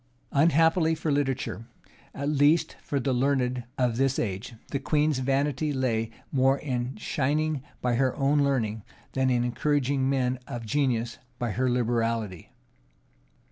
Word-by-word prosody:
Unhappily 160 +2 +4
for 160 -1 -2
literature, 135 -5 -1 0.5
at 140 +1 -3
least 150 +2 +3
for 140 - -2
the 135 0 0
learned 125 -1 +1
of 125 -3 +1
this 135 0 +2
age, 105 +3 -3 0.2
the 140 - -1
queen's 150 0 +1
vanity 140 +3 0
lay 115 -5 0 0.2
more 135 0 +3
in 125 -2 -3
shining 150 0 0 0.2
by 125 -1 +1
her 130 +1 +1
own 140 +2 +2
learning, 115 -6 0 0.3
than 130 0 +1
in 120 -1 +2
encouraging 135 +2 +1
men 130 -2 0
of 120 -1 -6
genius 120 -2 0 0.2
by 120 -2 -2
her 130 +3 0
liberality. 115 -5 -1
130 Hz, 140 wpm, -27 LUFS, 120-145 Hz, 0.5 s, Unhappily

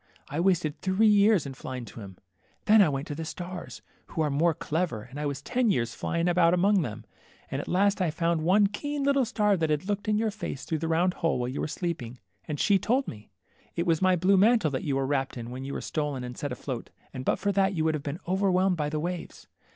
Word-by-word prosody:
I 145 - -3
wasted 170 -4 +1
three 190 +3 +2
years 205 -4 +5
in 135 - -5
flying 130 -1 -6
to 115 - -11
him. 95 -3 -10 0.5
Then 215 0 +7
I 185 - +5
went 135 0 -3
to - - -2
the 160 +3 -5
stars, 175 +2 -7 0.2
who 160 - -3
are 150 - 0
more 160 +3 +2
clever, 160 -9 -2
and 130 +5 -9
I 150 - -1
was 140 0 -4
ten 245 - +1
years 120 - 0
flying 170 +1 -1
about 175 -1 +4
among 195 +2 +3
them, 110 -8 -5 0.5
and 135 +1 -1
at - - -10
last 200 +2 +2
I 180 - +2
found 165 +1 0
one 190 +6 +4
keen 285 +8 -2
httle 280 -3 +3
star 210 -3 +2
that 160 -2 0
had 150 +2 0
looked 205 0 -2
in 210 0 +2
your 220 0 0
face 200 -10 -6
through 160 - -2
the 165 - -2
round 170 +3 +2
hole 165 -3 0
while 125 0 -2
you 130 - -4
were - - -1
sleeping, 150 -8 -4 0.3
and 150 -2 -4
she 200 -2 +4
told 255 +8 +1
me. 105 -1 -9 0.5
It 170 - -1
was 165 -2 +2
my 185 -1 +4
blue 185 +3 +3
mantle 215 -5 +4
that 130 - -3
you 140 -3 -1
were 135 0 0
wrapped 135 -1 -1
in 120 0 -6
when 130 +1 -6
you 140 - -5
were - - -4
stolen 145 -4 -3
and 125 0 -6
set 145 +1 -4
afloat, 125 -1 -5 0.2
and 130 -2 -5
but - - +1
for 200 - 0
that 195 0 +2
you 160 - 0
would 160 - +2
have 155 - -2
been 145 +4 -5
overwhelmed 190 -1 +2
by 150 -1 -1
the 155 0 -2
waves. 175 +2 -5
165 Hz, 250 wpm, -27 LUFS, 140-195 Hz, 0.5 s, Then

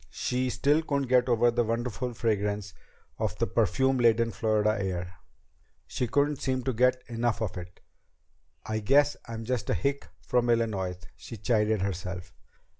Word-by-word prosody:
She 125 +5 -1
still 145 +5 +2
couldn't 140 -5 -1
get 125 0 +4
over 120 0 +4
the 120 0 +1
wonderful 120 +1 -2
fragrance 105 -3 -1 0.5
of - - -2
the - - +1
perfume 130 -1 +1
laden 115 -1 +3
Florida 110 -2 +1
air. 90 -2 -3 0.7
She 125 - -2
couldn't 145 +4 +1
seem 130 -1 -1
to 130 - -1
get 125 +2 +2
enough 120 -1 -1
of 110 -5 -3
it. 90 -1 -9 0.8
"I 110 0 -2
guess 140 +7 +3
I'm 115 -1 -6
just 125 -1 -2
a - - +2
hick 140 +1 -1
from 120 -1 0
Illinois," 105 -6 0 0.2
she 115 - -9
chided 105 -1 +1
herself. 90 -2 -4
115 Hz, 155 wpm, -28 LUFS, 105-125 Hz, 0.8 s, get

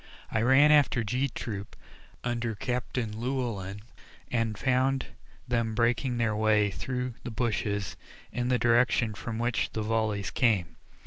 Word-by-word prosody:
I 110 - +1
ran 135 +5 +6
after 145 -5 +4
G 125 +6 0
Troop 100 -4 -6 0.5
under 120 -2 -1
Captain 120 -1 -2
Llewellyn, 115 -6 -3 0.5
and 115 -3 0
found 130 +2 +1 0.4
them 115 -2 0
breaking 120 +2 +1
their 115 -2 +1
way 105 -1 +3
through 125 +4 -3
the - - -4
bushes 105 -3 -1 0.4
in 120 +2 -2
the 125 0 +3
direction 120 -1 +3
from 110 +2 -5
which 120 -1 0
the 110 - -2
volleys 110 -2 0
came. 105 -9 +1
115 Hz, 135 wpm, -29 LUFS, 110-125 Hz, 0.5 s, ran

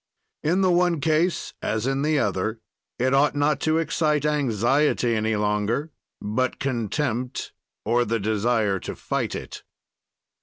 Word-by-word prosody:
"In 175 +5 +1
the 185 -1 +4
one 175 -2 +2
case, 160 +4 +1
as 110 +1 -1
in 135 +1 0
the 155 +1 +2
other, 105 -1 -1 0.4
it 130 +2 +1
ought 145 +2 +3
not 145 0 +2
to 155 +1 +1
excite 155 -2 +1
anxiety 135 -2 +2
any 110 0 0
longer, 105 +8 0 0.3
but 120 +5 -1
contempt 125 0 -2 0.3
or 120 +3 +3
the 115 0 -1
desire 105 -1 +1
to - - -6
fight - - -2
it. - - -7
130 Hz, 140 wpm, -24 LUFS, 110-150 Hz, 0.4 s, the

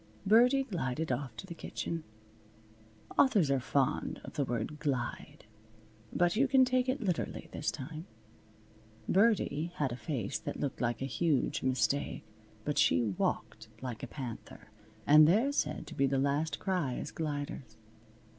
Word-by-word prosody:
Birdie 245 +6 +5
glided 160 - -2
off 125 -3 -3
to - - -7
the 180 - -7
kitchen. 165 0 -4 1.2
Authors 205 - +4
are 135 - +3
fond 135 +4 0
of - - -9
the 145 - 0
word 120 +4 -3
"glide." 130 -7 -3 0.7
But 175 +1 +2
you 270 +5 +3
can 265 -1 +5
take 255 0 +1
it 260 -1 -1
literally 180 -5 -2
this 150 - -2
time. 155 +4 -6 1.0
Birdie 190 -6 +2
had 145 -7 0
a - - -3
face 125 -6 -3
that - - -5
looked 140 -3 -3
like 120 +1 -1
a 135 - -4
huge 155 -7 +2
mistake, 130 +2 0 0.4
but 150 - 0
she 120 - +4
walked 100 -5 -2
like 125 -4 -6
a - - -5
panther, 125 -6 -8 0.4
and 150 +1 +8
they're 225 - +3
said 155 - -1
to - - -9
be 135 - +2
the 135 0 +1
last 145 +3 0
cry 175 -10 -1
as - - -5
gliders. 145 -7 -4
150 Hz, 155 wpm, -32 LUFS, 130-180 Hz, 1.2 s, and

